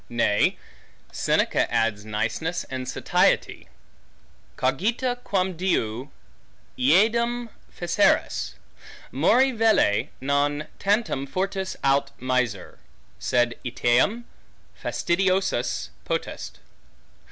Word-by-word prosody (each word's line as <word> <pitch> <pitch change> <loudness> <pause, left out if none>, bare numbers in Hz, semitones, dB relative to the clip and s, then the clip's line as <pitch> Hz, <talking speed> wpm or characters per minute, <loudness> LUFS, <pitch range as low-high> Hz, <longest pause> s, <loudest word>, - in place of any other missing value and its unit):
Nay, 115 -3 +2 0.5
Seneca - - +1
adds 105 -2 0
niceness 110 +11 -2
and 130 -1 -4
satiety: - - +1 0.9
Cogita 225 - 0
quamdiu 180 - -1 0.7
eadem 230 - +2 0.2
feceris; - - +1 0.6
mori 265 +2 +4
velle, 225 - +3
non 145 +2 0
tantum 200 - 0
fortis 190 +3 -2
aut 140 0 +2
miser, 125 -6 -2 0.4
sed 120 -1 +1
etiam 125 - +1 0.5
fastidiosus 170 - 0
potest. - - -4
145 Hz, 75 wpm, -25 LUFS, 120-195 Hz, 0.9 s, mori